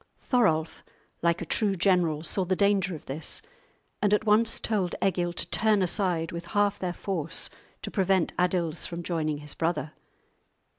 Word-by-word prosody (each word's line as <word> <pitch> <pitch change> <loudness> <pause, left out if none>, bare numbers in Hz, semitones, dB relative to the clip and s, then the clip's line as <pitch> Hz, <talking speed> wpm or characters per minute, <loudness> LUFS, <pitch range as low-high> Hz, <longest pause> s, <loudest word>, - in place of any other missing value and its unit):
Thorolf, 165 - +1 0.4
like 170 +1 +1
a - - -6
true 200 +4 +1
general, 175 -4 +2
saw 190 +3 +1
the 185 +1 0
danger 195 -2 +2
of 155 - -11
this, 150 - -3 0.6
and 205 0 +4
at 215 - -2
once 220 +2 +4
told 195 -6 -1
Egil 175 -2 +1
to - - -2
turn 215 -3 +3
aside 175 -2 0
with 170 0 -6
half 205 -1 +2
their 180 -1 -2
force 170 -3 -2 0.3
to - - -4
prevent 190 -3 +1
Adils 175 -2 0
from 170 0 -6
joining 155 -3 -1
his 150 0 -6
brother. 160 -2 -2
180 Hz, 160 wpm, -27 LUFS, 165-200 Hz, 0.6 s, and